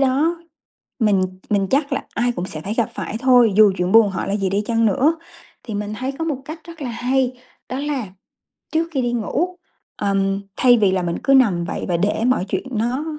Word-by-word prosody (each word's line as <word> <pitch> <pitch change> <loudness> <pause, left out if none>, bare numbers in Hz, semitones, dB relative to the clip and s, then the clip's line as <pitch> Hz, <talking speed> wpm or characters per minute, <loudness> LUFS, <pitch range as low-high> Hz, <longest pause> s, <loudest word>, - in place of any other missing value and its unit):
đó 285 +6 +2 0.6
mình 205 -4 +3 0.3
mình 200 -2 +1
chắc 280 +1 +1
là - - -2
ai 245 +1 +1
cũng 180 -6 -4
sẽ 155 -4 -7
phải 205 +5 -4
gặp 230 -2 0
phải 220 - -4
thôi, 245 -4 +5
dù 210 -2 +7
chuyện 180 +1 0
buồn 225 -1 +6
họ 190 - -3
là 200 - 0
gì 195 -2 -1
đi 200 +2 0
chăng 230 0 +1
nữa. 275 - +2 0.5
Thì 220 - -6
mình 210 +1 -3
thấy 260 +2 -2
có 325 +4 -4
một 300 -5 -1
cách 315 +2 -8
rất 335 -2 -11
là 260 - -3
hay, 255 +2 0 0.4
đó 255 - -3
là 280 -6 -2 0.7
trước 325 +1 +1
khi 270 -4 0
đi 240 0 -1
ngủ, 305 - -1 0.4
ờm, 195 -1 0 0.2
thay 245 -2 +5
vì 200 -3 +3
là 185 -1 0
mình 170 -1 -2
cứ 275 - +3
nằm 200 -10 +4
vậy - - -4
và 175 - +1
để 205 +5 0
mọi 255 -7 +2
chuyện - - -2
nó 240 +6 -1
235 Hz, 225 wpm, -20 LUFS, 200-270 Hz, 0.7 s, dù